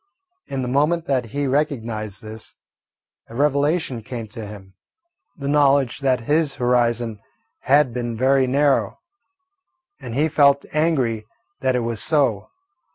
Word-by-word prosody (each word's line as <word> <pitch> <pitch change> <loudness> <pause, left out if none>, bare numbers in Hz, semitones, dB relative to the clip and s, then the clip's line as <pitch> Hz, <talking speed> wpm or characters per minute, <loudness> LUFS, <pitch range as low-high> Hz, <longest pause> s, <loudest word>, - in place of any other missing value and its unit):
In 135 -1 -3
the - - -3
moment 150 +6 +1
that 130 -3 0
he 140 +6 -3
recognised 115 -8 -2
this, 110 0 -8 0.7
a 115 - -10
revelation 145 -1 +1
came 115 +1 -6
to 110 0 -7
him, 95 -2 -11 0.6
the 140 -2 -5
knowledge 140 -3 +3
that 130 -3 +1
his 150 +3 +1
horizon 120 -3 +1 0.4
had 135 -2 +3
been 120 -2 -3
very 130 +1 +3
narrow, 140 +1 +2 1.0
and 115 - -7
he 150 +4 +2
felt 140 -2 +3
angry 130 -9 0 0.3
that 130 -3 +1
it 125 - +1
was 115 -2 -3
so. 140 -9 +1
130 Hz, 135 wpm, -22 LUFS, 115-145 Hz, 1.0 s, knowledge